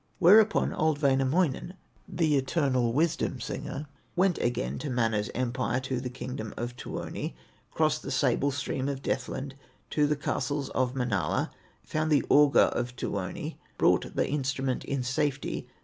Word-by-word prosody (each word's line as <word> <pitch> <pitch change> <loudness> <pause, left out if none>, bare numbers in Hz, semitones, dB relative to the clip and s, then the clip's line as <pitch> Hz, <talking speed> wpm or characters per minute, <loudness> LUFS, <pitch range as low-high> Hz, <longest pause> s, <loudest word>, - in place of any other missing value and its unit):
Thereupon 205 +4 +6
old 155 -2 +1
Wainamoinen, 140 +5 +2 0.3
The 165 -4 +1
eternal 130 -3 +1
wisdom 155 +6 0
singer, 150 - -5 0.3
Went 185 -1 +2
again 70 - -1
to 150 - -4
Mana's 115 -4 0
empire, 130 0 0
To 130 -1 -2
the 125 - -4
kingdom 125 -3 -6
of 120 +1 -4
Tuoni, - - -5 0.3
Crossed - - +1
the - - -6
sable 140 - +2
stream 140 0 -2
of 135 -1 -4
Deathland, 135 +1 -2 0.4
To 150 -1 +3
the 150 - +1
castles 145 -1 -2
of 130 0 0
Manala, 110 - 0 0.3
Found 155 0 -1
the 145 -3 +4
auger 145 0 +6
of 125 +1 -3
Tuoni, 125 - -4 0.2
Brought - - +2
the - - +1
instrument 135 -2 -1
in 140 -2 -1
safety. 140 +2 -1
135 Hz, 145 wpm, -28 LUFS, 125-150 Hz, 0.4 s, Thereupon